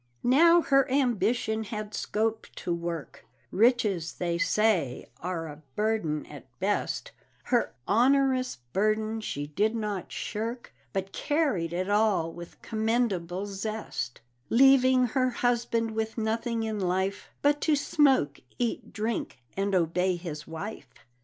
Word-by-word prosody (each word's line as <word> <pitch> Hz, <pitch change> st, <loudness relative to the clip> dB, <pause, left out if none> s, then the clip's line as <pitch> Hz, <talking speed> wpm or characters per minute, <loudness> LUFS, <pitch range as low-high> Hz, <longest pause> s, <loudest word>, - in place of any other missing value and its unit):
Now 335 Hz, +7 st, +6 dB
her 275 Hz, -1 st, +3 dB
ambition 235 Hz, -4 st, +1 dB
had 215 Hz, 0 st, -5 dB
scope 220 Hz, +2 st, -1 dB
to 175 Hz, -, -2 dB
work 170 Hz, -3 st, -5 dB, 0.3 s
Riches, 210 Hz, -6 st, +2 dB
they 170 Hz, -1 st, -2 dB
say, 185 Hz, -, +1 dB, 0.2 s
are 175 Hz, -2 st, -3 dB
a 150 Hz, 0 st, -10 dB
burden 210 Hz, -9 st, 0 dB
at 145 Hz, -3 st, -11 dB
best; 205 Hz, +2 st, -1 dB, 0.3 s
Her 240 Hz, -2 st, +1 dB
onerous 255 Hz, +3 st, +3 dB, 0.2 s
burden 215 Hz, +2 st, +1 dB
she 145 Hz, -8 st, -3 dB
did 205 Hz, +10 st, 0 dB
not 210 Hz, -4 st, -3 dB
shirk, 230 Hz, +3 st, -4 dB, 0.2 s
But 195 Hz, +4 st, -3 dB
carried 285 Hz, -, 0 dB
it 180 Hz, +2 st, -2 dB
all 205 Hz, -5 st, +2 dB
with 170 Hz, 0 st, -10 dB
commendable 215 Hz, -5 st, 0 dB
zest; 200 Hz, -, -4 dB, 0.3 s
Leaving 260 Hz, 0 st, +6 dB
her 255 Hz, +2 st, +1 dB
husband 235 Hz, -2 st, 0 dB
with 220 Hz, +1 st, -3 dB
nothing 225 Hz, +1 st, -1 dB
in 220 Hz, -1 st, -2 dB
life 190 Hz, +1 st, -1 dB
But 290 Hz, +1 st, +3 dB
to 310 Hz, -, +3 dB
smoke, 270 Hz, -, +2 dB, 0.2 s
eat, 240 Hz, -2 st, -2 dB
drink, 220 Hz, -6 st, -3 dB, 0.2 s
and 195 Hz, 0 st, 0 dB
obey 180 Hz, +1 st, +2 dB
his 170 Hz, -3 st, -7 dB
wife. 160 Hz, -, -7 dB
215 Hz, 125 wpm, -28 LUFS, 180-240 Hz, 0.3 s, Now